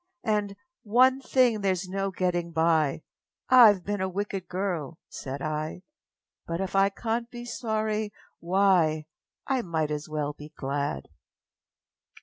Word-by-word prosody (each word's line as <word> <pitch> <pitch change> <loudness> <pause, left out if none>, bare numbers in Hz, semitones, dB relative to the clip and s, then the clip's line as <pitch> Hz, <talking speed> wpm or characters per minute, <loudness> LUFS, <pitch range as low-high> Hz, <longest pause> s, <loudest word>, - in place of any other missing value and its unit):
And, 210 -3 0 0.3
âOne 255 +5 +4
thing 250 -5 +3
thereâs 185 -2 0
no 195 +1 -2
getting 175 -2 -1
by 160 -3 +2 0.5
Iâve 220 -7 +8
been 205 0 -2
a 190 - 0
wicked 195 0 -4
girl,â 180 -5 -3
said 135 +1 -6
I; 155 +3 -3 0.7
âBut 165 +1 -2
if 190 0 -3
I 195 0 +5
canât 230 +3 -3
be 240 -1 -8
sorry, 220 -3 -2 0.3
why, 175 -4 +3 0.4
I 265 -2 +1
might 160 -6 -1
as 150 0 -4
well 150 -1 -2
be 150 +1 -11
glad! 140 - -2
190 Hz, 135 wpm, -27 LUFS, 155-215 Hz, 0.7 s, Iâve